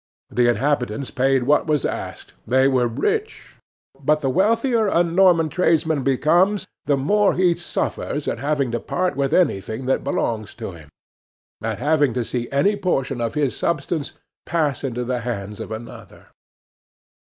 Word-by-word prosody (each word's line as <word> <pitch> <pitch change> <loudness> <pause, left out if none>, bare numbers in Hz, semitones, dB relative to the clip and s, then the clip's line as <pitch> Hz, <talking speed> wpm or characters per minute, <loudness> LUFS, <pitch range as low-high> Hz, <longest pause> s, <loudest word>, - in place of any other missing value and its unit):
The 120 -1 +2
inhabitants 125 0 -1
paid 135 0 +2
what 145 +5 +2
was 150 -3 +1
asked; - - -5
they 130 +3 +4
were 130 -3 +2
rich. 420 - -3 0.4
But, 150 +2 +1
the 135 -3 0
wealthier 225 - +2
a 175 -3 +3
Norman 170 -1 +4
tradesman 160 -3 +1
becomes, 170 +10 +2 0.2
the 145 -2 +3
more 205 +9 +2
he 180 -2 +3
suffers 165 -3 -3
at 115 - -2
having 140 -2 0
to 120 - -1
part 180 +8 -1
with 135 0 0
anything 110 - 0
that 130 - 0
belongs 110 -6 -2
to 110 -4 -6
him, 80 -4 -14 0.7
at 110 -1 -2
having 145 -1 +2
to 125 - 0
see 120 +1 -3
any 190 +10 +2
portion 135 -10 -1
of 115 -1 -2
his 145 -4 0
substance 170 -3 -2 0.3
pass 150 -6 -1
into 125 -2 -2
the 125 0 -1
hands 105 -4 -5
of - - -7
another. 110 +1 -10
140 Hz, 155 wpm, -22 LUFS, 120-170 Hz, 0.7 s, they